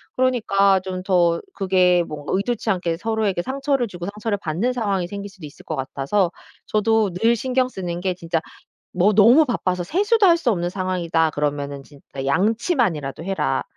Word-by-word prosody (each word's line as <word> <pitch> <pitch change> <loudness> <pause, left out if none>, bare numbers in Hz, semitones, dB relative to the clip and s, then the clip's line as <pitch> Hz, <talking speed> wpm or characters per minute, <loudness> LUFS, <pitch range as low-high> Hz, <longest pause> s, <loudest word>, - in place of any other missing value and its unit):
그러니까 200 -7 +3
좀 185 0 -6
더 175 -3 +2
그게 185 -2 +3
뭔가 150 -1 -6
의도치 220 +3 -1
않게 175 -3 -1
서로에게 215 -3 -1
상처를 270 -1 -1
주고 175 -3 -7
상처를 210 0 -3
받는 185 +10 -1
상황이 200 -7 -1
생길 200 +2 -7
수도 190 -5 -12
있을 145 - -13
것 155 - -4
같아서 140 +7 -1 0.3
저도 215 -2 +1
늘 225 +6 +2
신경 255 +2 0
쓰는 175 -6 -5
게 185 -1 -1
진짜 165 -2 -2 0.5
뭐 190 +4 +3
너무 240 +9 +6
바빠서 180 -8 -1
세수도 405 - +2
할 340 -2 +6
수 310 -8 0
없는 175 -5 -1
상황이다 175 -3 0
그러면은 145 -1 -3
진짜 135 -1 -9
"양치만이라도 190 - 0
해라." 185 -8 -1
190 Hz, 360 characters per minute, -22 LUFS, 170-225 Hz, 0.5 s, 너무